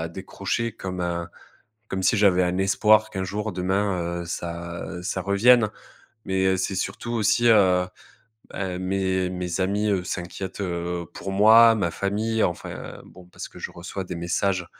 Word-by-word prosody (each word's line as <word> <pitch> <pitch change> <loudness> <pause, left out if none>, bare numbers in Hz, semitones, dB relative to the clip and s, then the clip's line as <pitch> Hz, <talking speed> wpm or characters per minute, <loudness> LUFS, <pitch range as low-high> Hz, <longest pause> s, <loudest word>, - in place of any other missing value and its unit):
à - - -4
décrocher 100 +6 -3
comme 95 -4 -6
un 85 -1 -2 0.6
comme 95 0 -3
si 105 - +3
j'avais 95 -3 +4
un 90 +1 0
espoir 105 +3 +4
qu'un 95 -1 -3
jour, 105 +3 -3
demain, 90 -2 -1
heu, - - -7
ça 85 0 -5 0.2
ça 95 0 -2
revienne. 110 +3 +4 0.6
Mais 95 0 +1
c'est 95 +1 -2
surtout 120 +5 -3
aussi, 120 +2 +2
heu, 95 -5 +4 0.6
ben, 90 -2 -4
mes 95 -1 0
mes 90 0 -3
amis, 100 +3 0
heu, 95 -3 +1
s'inquiètent, 95 +2 -5
heu, 85 -1 -3
pour 95 - -6
moi, 110 +3 +7
ma 85 -5 0
famille. 110 +3 -1
Enfin 85 - -4
bon, 90 0 -15
parce 90 - -9
que - - -14
je - - -5
reçois 90 +3 -6
des 90 -1 -6
messages, 90 +1 -1
95 Hz, 160 wpm, -24 LUFS, 90-100 Hz, 0.6 s, moi